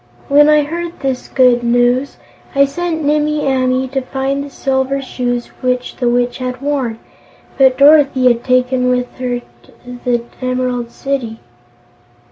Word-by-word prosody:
When 295 +2 +6
I 300 -1 +5
heard 340 +3 -6
this 265 -2 -2
good 250 -2 +3
news, 245 +3 +1 0.4
I 280 0 +5
sent 320 +2 -3
Nimmie 300 +1 +1
Amee 260 0 +1
to 270 0 -2
find 270 +2 -2
the 285 - -8
Silver 270 0 -1
Shoes 245 -2 -3
which 250 -1 -2
the 245 -2 +1
Witch 245 +1 0
had 255 -1 -4
worn, 275 -5 -2 0.6
but 260 -1 +5
Dorothy 280 -2 +5
had 240 -1 +3
taken 255 0 +1
them 250 - +3
with 250 0 -5
her 245 -1 -2 0.2
to 245 0 -13
the 240 -1 0 0.2
Emerald 255 -1 -2
City." 240 -4 -4
255 Hz, 150 wpm, -16 LUFS, 245-275 Hz, 0.6 s, When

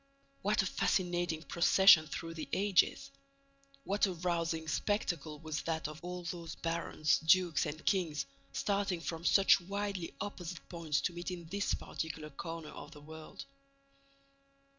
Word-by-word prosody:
What 205 +1 +2
a - - -3
fascinating 175 -4 0
procession 170 -2 +6
through 165 +3 -5
the 160 -2 -6
ages! 205 +7 +2 0.7
What 200 -1 +2
a 190 - -2
rousing 170 -2 -1
spectacle 160 -3 -1
was 155 0 -4
that 160 -2 -2
of 155 +2 -10
all 180 0 -5
those 170 -1 -5
barons, 165 -2 0
dukes 175 0 +3
and 155 +2 -6
kings, 165 - +1 0.3
starting 200 - 0
from 165 0 -4
such 195 +1 +5
widely 200 -1 -3
opposite 180 -4 -6
points 165 -4 -1
to 180 - -1
meet 175 +1 -5
in 175 -2 -6
this 200 +3 0
particular 155 -1 -5
corner 165 +2 -6
of 145 - -9
the 150 - -13
world! 155 +1 -10
170 Hz, 140 wpm, -33 LUFS, 160-185 Hz, 0.7 s, procession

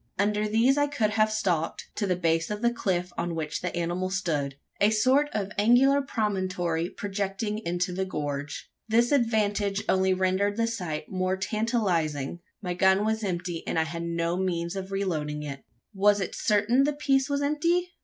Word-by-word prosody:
Under 210 +1 +1
these 235 +6 +3
I 290 - +3
could 230 -8 0
have 215 +1 +2
stalked, 180 -7 -1
to 205 - -2
the 180 - +2
base 165 -1 +1
of 210 +2 -4
the 240 0 +3
cliff 180 -5 -1
on 170 0 -2
which 155 -1 -3
the 180 -1 -3
animal 175 +2 -1
stood 155 -8 -1 0.2
a 205 - +5
sort 255 +7 +3
of 205 -2 -2
angular 255 +6 +5
promontory 185 -9 -1
projecting 205 +2 -3
into 175 -2 -2
the 190 +1 -1
gorge. 145 -5 -4 0.2
This 235 +3 +3
advantage 210 -5 +1
only 190 0 +3
rendered 190 +2 +1
the 230 - +2
sight 180 -10 -4
more 185 0 0
tantalising: 190 - -1 0.2
my 180 -1 -2
gun 190 +3 +3
was 220 0 0
empty, 175 -3 -3
and - - -1
I 160 - +4
had 165 +1 -5
no 170 0 -1
means 175 -1 -1
of 190 0 -5
reloading 155 -7 -2
it. 140 -2 -6 0.3
Was 205 +1 +4
it 190 - -3
certain 215 +5 +2
the 295 +1 +1
piece 275 -2 +1
was 285 0 0
empty? 335 +5 +1
195 Hz, 175 wpm, -27 LUFS, 175-220 Hz, 0.3 s, a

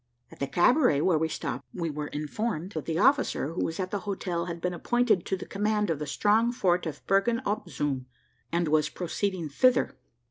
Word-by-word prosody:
At - - -14
the 140 - -1
cabaret 180 - +4
where 165 -2 +3
we 160 - +1
stopped, 140 -4 -4
we 170 -3 -2
were 150 0 -4
informed 165 +5 -3
that 155 -6 -5
the 165 -1 -1
officer 265 - +3
who 180 - -1
was 165 - -3
at 185 -1 -2
the 205 - -1
hotel 185 -4 -3
had 170 -1 -5
been 180 +1 -1
appointed 240 0 +1
to 190 - 0
the - - -7
command 210 -1 0
of 155 - -2
the 150 - -4
strong 215 +9 +3
fort 180 -7 +1
of 155 - -7
Bergen 195 +4 +2
op 205 -2 -2
Zoom, 135 -3 -2 0.4
and 170 0 +1
was 155 0 +3
proceeding 185 -1 -2
thither. 250 - +3
180 Hz, 205 wpm, -28 LUFS, 155-210 Hz, 0.4 s, cabaret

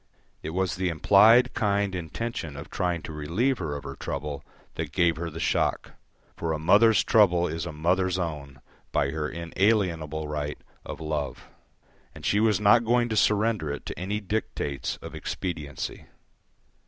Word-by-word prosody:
It - - -5
was 95 +3 -1
the 95 -1 0
implied 110 +9 +5
kind 100 -2 0
intention 85 -3 -4
of 70 - -9
trying 90 -3 -1
to 80 - -7
relieve 90 - 0
her 80 -5 -3
of 70 - -6
her - - -7
trouble 70 0 -5 0.3
that - - -4
gave 85 -1 +2
her 85 0 -3
the 80 +1 -8
shock, - - 0 0.4
for 80 -1 -2
a - - -1
mother's 100 +7 +5
trouble 90 -5 +4
is 80 +1 -4
a - - -4
mother's 90 +4 +1
own 75 -6 -5 0.3
by 70 - +1
her 75 0 -2
inalienable 85 -4 0
right 75 0 -3 0.3
of - - -7
love, 75 -3 -4 0.7
and - - -10
she 105 - +2
was 110 -2 +3
not 105 +3 +5
going 120 +1 +2
to 110 - -1
surrender 105 -6 +2
it 70 - -6
to - - -6
any 100 +3 -2
dictates 100 -9 -3
of - - -8
expediency. 75 -7 -5
85 Hz, 165 wpm, -26 LUFS, 75-105 Hz, 0.7 s, implied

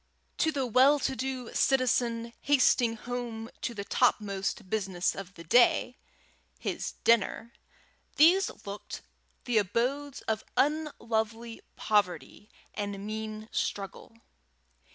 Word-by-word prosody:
To 320 - +3
the 275 -3 -1
well 260 +5 +5
to 270 -1 -1
do 260 -1 -4
citizen 240 -3 +1
hastening 255 -4 +3
home 235 -1 -5
to 235 - -3
the 200 - -4
topmost 200 -4 0
business 190 -3 -1
of 195 -1 -9
the 170 - -10
day, 240 +6 +4 0.6
his - - -4
dinner, 230 +1 +2 0.6
these 350 +6 +5 0.2
looked 200 +1 -7 0.4
the 240 -4 +3
abodes 255 +8 -1
of 220 -1 -2
unlovely 230 -6 -1
poverty 205 0 -1 0.2
and 200 -1 -4
mean 215 0 -5
struggle. 200 +3 -4
230 Hz, 110 wpm, -29 LUFS, 210-255 Hz, 0.6 s, well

